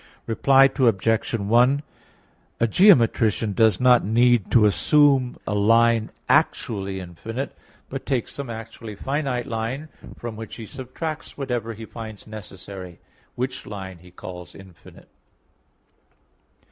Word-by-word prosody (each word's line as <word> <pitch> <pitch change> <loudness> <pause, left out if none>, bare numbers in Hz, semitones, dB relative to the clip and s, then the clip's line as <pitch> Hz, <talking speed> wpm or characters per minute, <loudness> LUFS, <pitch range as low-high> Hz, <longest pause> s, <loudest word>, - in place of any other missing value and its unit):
Reply 135 +4 +4
Obj. 115 -3 +2
1: 120 +7 +3 0.8
A 115 - +3
geometrician 115 - +4
does 110 -3 +3
not 125 -1 +5
need 120 0 +3
to 115 -3 +5
assume 130 - +3
a - - -2
line 115 +2 +3 0.2
actually 95 -3 +1
infinite, 115 +9 -6 0.3
but 135 0 -6
takes 130 -5 -2
some 140 -3 -6
actually 115 -1 -8
finite 135 +1 -2
line, 125 +5 -4 0.3
from 120 -2 -6
which 110 0 -8
he 115 - -8
subtracts 140 +6 -7
whatever 120 -5 -3
he 110 +1 -9
finds 110 -2 -9
necessary; 95 -4 -10 0.4
which 130 +1 -4
line 95 -4 -7
he 90 +2 -16
calls 90 0 -10
infinite. 95 -3 -15
115 Hz, 120 wpm, -23 LUFS, 105-130 Hz, 0.8 s, not